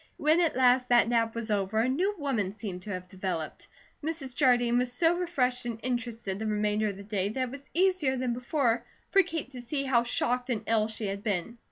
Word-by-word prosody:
When 310 +4 +3
at 335 - +1
last 250 0 +4
that 240 -1 +5
nap 230 -1 +1
was 230 -1 -3
over, 200 +1 0
a 225 +3 +3
new 365 +11 +1
woman 225 - -1
seemed 190 -5 -5
to 210 - -8
have 185 -2 -5
developed. 185 -4 -4 0.4
Mrs. 300 -5 -4
Jardine 245 -3 +4
was 250 0 -1
so 325 +7 +3
refreshed 265 -9 0
and 230 -2 -4
interested 235 -5 -3
the 220 - -2
remainder 210 0 +1
of 200 -2 -4
the 200 - -9
day 200 -1 -1
that 255 +3 -2
it - - -12
was 280 +1 -10
easier 360 -7 +2
than 250 -1 -1
before 250 -1 0 0.3
for 390 - +7
Kate 325 -6 -5
to 250 -2 -7
see 275 +4 -2
how 260 -3 +3
shocked 245 +1 0
and 225 -3 -1
ill 220 -1 +2
she 220 0 -5
had 200 0 -3
been. 210 +2 -2
240 Hz, 220 wpm, -29 LUFS, 215-265 Hz, 0.4 s, for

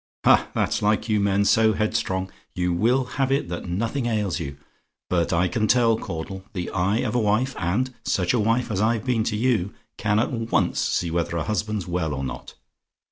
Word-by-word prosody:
Ha! - - +5
that's - - 0
like 105 +2 +1
you 105 -1 +3
men 100 0 +2
so 110 +1 +4
headstrong! 95 -3 -1 0.2
You 90 -1 0
will 120 +9 +2 0.2
have 135 0 +2
it 135 -10 0
that 85 +1 -5
nothing 115 +8 -1
ails 105 -6 -1
you; 70 -4 -5 0.5
but 85 -2 +1
I 90 +1 +2
can 110 +3 0
tell, 115 -1 +4
Caudle. 95 -1 -6
The 90 -3 -4
eye 95 +5 +1
of - - -2
a 125 - +2
wife 110 +5 +1
and 115 +10 0
such 90 -2 +1
a 125 - +2
wife 115 +3 +1
as 95 -1 0
I've 110 +1 +1
been 120 -4 +1
to 105 -2 -1
you 110 -5 0 0.2
can 105 0 +1
at 110 - +1
once 115 -2 0
see 85 - 0
whether 85 0 -1
a 80 - -1
husband's 105 -2 -2
well 85 -4 -1
or 70 - -4
not. 65 - -6
105 Hz, 200 wpm, -24 LUFS, 90-115 Hz, 0.5 s, Ha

